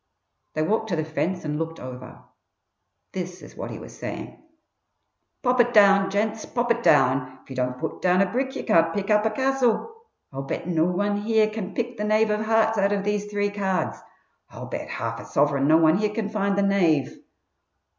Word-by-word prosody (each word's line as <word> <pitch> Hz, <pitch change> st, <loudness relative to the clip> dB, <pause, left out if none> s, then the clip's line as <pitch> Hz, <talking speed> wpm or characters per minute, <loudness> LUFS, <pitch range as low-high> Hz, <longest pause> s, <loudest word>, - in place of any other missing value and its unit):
They 155 Hz, -, +1 dB
walked 220 Hz, +5 st, 0 dB
to 175 Hz, -, 0 dB
the 155 Hz, -1 st, -1 dB
fence 160 Hz, +3 st, -2 dB
and 150 Hz, 0 st, -2 dB
looked 165 Hz, 0 st, -4 dB
over. 125 Hz, -1 st, -9 dB, 0.9 s
This 180 Hz, -1 st, -6 dB
is -, -, -13 dB
what -, -, -6 dB
he -, -, -6 dB
was -, -, -11 dB
saying: -, -, -7 dB, 1.0 s
"Pop 250 Hz, -1 st, +4 dB
it 240 Hz, 0 st, -1 dB
down, 195 Hz, -2 st, +6 dB
gents! 215 Hz, +2 st, -1 dB
Pop 240 Hz, 0 st, -1 dB
it 235 Hz, 0 st, +1 dB
down! 130 Hz, -, +3 dB
If -, -, -17 dB
you -, -, -6 dB
don't 125 Hz, 0 st, -1 dB
put 160 Hz, +3 st, -5 dB
down 180 Hz, 0 st, +3 dB
a 195 Hz, -, +5 dB
brick 265 Hz, +2 st, -2 dB
you -, -, -4 dB
can't 165 Hz, 0 st, +3 dB
pick 200 Hz, +1 st, -2 dB
up 210 Hz, +1 st, +4 dB
a -, -, +1 dB
castle! 265 Hz, -, 0 dB, 0.4 s
I'll 135 Hz, -, -4 dB
bet 135 Hz, +4 st, -5 dB
no 165 Hz, -2 st, +2 dB
one 205 Hz, +3 st, 0 dB
here 215 Hz, +1 st, +2 dB
can 205 Hz, -3 st, -6 dB
pick 240 Hz, 0 st, -3 dB
the 210 Hz, -, -3 dB
knave 215 Hz, +1 st, +2 dB
of 210 Hz, 0 st, 0 dB
hearts 220 Hz, 0 st, +2 dB
out 200 Hz, +1 st, +2 dB
of 200 Hz, -1 st, -1 dB
these 205 Hz, 0 st, -1 dB
three 205 Hz, 0 st, -1 dB
cards. 195 Hz, -2 st, -2 dB, 0.5 s
I'll -, -, -9 dB
bet -, -, -6 dB
half -, -, -4 dB
a -, -, -9 dB
sovereign 140 Hz, -1 st, +1 dB
no 155 Hz, +1 st, +6 dB
one 160 Hz, +2 st, +4 dB
here 215 Hz, 0 st, +1 dB
can 210 Hz, 0 st, -3 dB
find 200 Hz, -2 st, 0 dB
the 200 Hz, -, +3 dB
knave!" 175 Hz, -8 st, +1 dB
200 Hz, 205 wpm, -24 LUFS, 160-215 Hz, 1.0 s, down